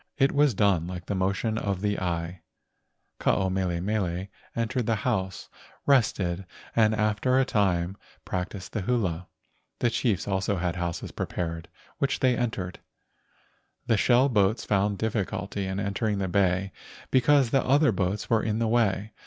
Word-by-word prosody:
It 135 -1 +4
was 145 -5 +3
done 95 -5 +2
like 90 -1 -6
the - - -2
motion 100 +4 0
of 100 -2 -2
the 105 -1 0
eye. 85 -1 -3 0.8
Ke - - -6
ao 95 - +3
mele 90 -2 -1
mele 95 -1 -2 0.3
entered 115 +1 -1
her 115 - +3
house, 95 -4 -2 0.4
rested, 100 -9 +2 0.3
and 110 -1 +4
after 105 +4 +1
a 135 - +3
time 95 -5 +1 0.3
practised 90 +1 -4
the 110 - -1
hula. 90 -6 -1 0.5
The 120 - +1
chiefs 110 -6 0
also 95 0 0
had 90 -2 -1
houses 85 -2 -3
prepared, 85 -2 -4 0.3
which 140 +1 0
they 130 -2 +3
entered. 100 -7 -3 1.1
The 115 - +3
shell 125 +5 +4
boats 105 -2 +2
found 100 0 +1
difficulty 100 -2 -2
in 95 +1 -3
entering 100 +1 -1
the 95 -1 -1
bay 95 0 +1 0.4
because 130 -1 +4
the 135 - +3
other 140 +1 +4
boats 95 +1 -1
were 115 -2 +3
in 110 -1 -1
the 115 0 +1
way. 110 -2 +1
100 Hz, 155 wpm, -27 LUFS, 95-115 Hz, 1.1 s, It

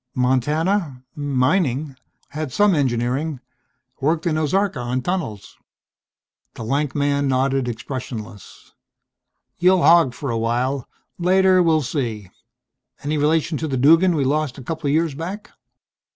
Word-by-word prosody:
"Montana 140 - 0
mining. 140 0 0 0.3
Had 155 -2 -5
some 205 +6 +3
engineering. 135 +1 -1 0.6
Worked 155 +3 0
in 165 -2 +1
Ozarka 155 +1 0
on 125 +1 -2
tunnels." 160 - -4 1.0
The - - -7
lank 140 +4 -1
man 140 -1 +1
nodded, 135 0 +1
expressionless. 120 -3 -7 0.9
"You'll 180 0 +4
hog 160 -5 +5
for 140 -1 -4
a 115 - -1
while. 125 +3 -1 0.3
Later 185 +1 +4
we'll 160 -3 +2
see.... 115 - -4 0.7
Any 150 +1 -1
relation 155 +1 +1
to 160 - -2
the 135 -3 -2
Duggan 165 +7 +5
we 145 - +1
lost 145 -1 -1
a 135 - -9
couple 160 +3 -4
of 140 - +1
years 165 -2 +1
back?" 185 +8 -7
145 Hz, 130 wpm, -21 LUFS, 130-165 Hz, 1.0 s, hog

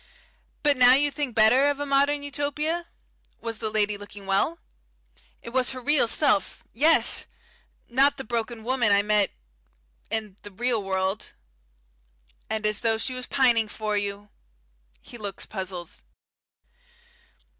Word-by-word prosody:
But 290 -2 +3
now 250 0 +7
you 290 +1 +3
think 280 -4 -4
better 240 +6 +5
of 285 -1 -2
a 290 - -2
modern 285 +1 +2
Utopia? 300 +4 -2 0.5
Was 225 -1 -5
the 220 - -2
lady 210 -1 +1
looking 205 -1 -11
well?" 195 +12 0 0.9
"It - - -7
was 255 +1 +1
her 255 - -7
real 285 0 +2
self. 225 -6 +2
Yes. 310 +7 +3 0.6
Not 275 +4 +3
the 270 - -6
broken 230 -1 -4
woman 245 -3 +1
I 200 0 +4
met 210 -1 +2 0.8
in 215 -3 -4
the 205 - -10
real 230 +3 -1
world." 190 +1 -2 1.2
"And 220 -1 -2
as 210 0 +1
though 225 -1 +1
she 255 +3 -2
was 255 0 -5
pining 240 -5 +3
for 215 0 -3
you." 205 0 -3 0.7
He 240 - -11
looks 200 -2 -6
puzzled. 185 -4 -6
230 Hz, 140 wpm, -25 LUFS, 210-275 Hz, 1.2 s, now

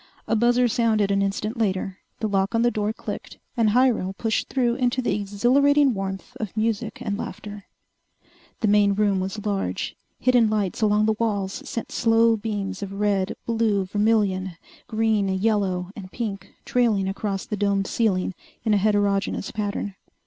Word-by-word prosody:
A 225 - +2
buzzer 240 +2 +3
sounded 220 -3 +2
an 195 0 +2
instant 210 +4 -2
later, 195 -3 -1 0.2
the 220 - +1
lock 195 +1 0
on 230 - +3
the 240 - +3
door 210 -1 -1
clicked, - - -7 0.2
and 230 -3 +3
Hyrel 235 -5 +2
pushed 225 -2 -1
through 245 -3 +1
into 250 0 0
the 250 - 0
exhilarating 255 +8 +3
warmth 195 -1 -5
of 215 -1 -5
music 220 0 -1
and 205 -1 -2
laughter. 205 -1 -7 1.0
The 220 - +2
main 205 -1 +4
room 200 -2 +2
was 195 +3 -4
large. 200 -2 -2 0.2
Hidden 245 -3 +4
lights 210 -1 -1
along 210 0 +3
the 220 - +3
walls 200 -4 -1
sent 230 - -4
slow 230 -1 +4
beams 205 -3 -4
of 195 -1 -5
red, 200 -1 +1
blue, 220 -4 +1
vermillion, 200 -3 +1 0.3
green, 220 -3 +1
yellow 190 -2 0
and 190 -3 -9
pink 210 -5 -4 0.2
trailing 220 -6 +2
across 195 0 -3
the 210 - -3
domed 200 -1 +1
ceiling 195 -4 0 0.3
in 215 - +3
a - - +5
heterogeneous 200 -1 +1
pattern. 205 -1 -3
210 Hz, 160 wpm, -24 LUFS, 195-225 Hz, 1.0 s, a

